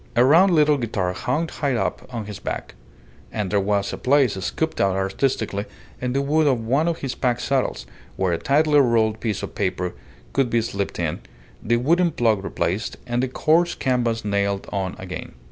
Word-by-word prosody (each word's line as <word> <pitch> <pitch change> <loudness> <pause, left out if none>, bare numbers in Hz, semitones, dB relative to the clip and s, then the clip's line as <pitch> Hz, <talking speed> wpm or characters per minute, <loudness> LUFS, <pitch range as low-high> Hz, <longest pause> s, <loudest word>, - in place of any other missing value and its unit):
A 120 - +5
round 170 +8 +6
little 150 -3 +4
guitar 100 -6 -1
hung 150 - -1
high 140 -4 -1
up 115 - -2
on 115 -3 -4
his 105 -2 -7
back; - - -5 0.6
and 105 -4 -3
there 100 - +3
was 100 0 0
a - - -5
place 135 -3 +3
scooped 130 - -2
out 95 -1 +2
artistically 100 +1 -1 0.4
in 125 0 -1
the 140 +1 +1
wood 155 +2 +2
of 130 -4 +3
one 140 +8 +2
of 170 -1 0
his 135 -2 -2
pack 125 -2 0
saddles 130 - -1 0.3
where 95 -2 0
a 85 - -1
tightly 150 +2 +3
rolled 110 -4 +2
piece 110 -4 -2
of - - -5
paper 90 -3 -2 0.4
could 135 -3 +2
be 115 0 +2
slipped 100 -3 -3
in, 85 -3 -2 0.4
the 120 +2 +1
wooden 170 +8 +3
plug 115 -9 +1
replaced, 95 +2 -2
and 120 0 -1
the 130 - 0
coarse 165 +6 +2
canvas 120 -4 0
nailed 100 -1 0
on 95 -2 -2
again. 90 -1 -7
120 Hz, 190 wpm, -23 LUFS, 100-140 Hz, 0.6 s, round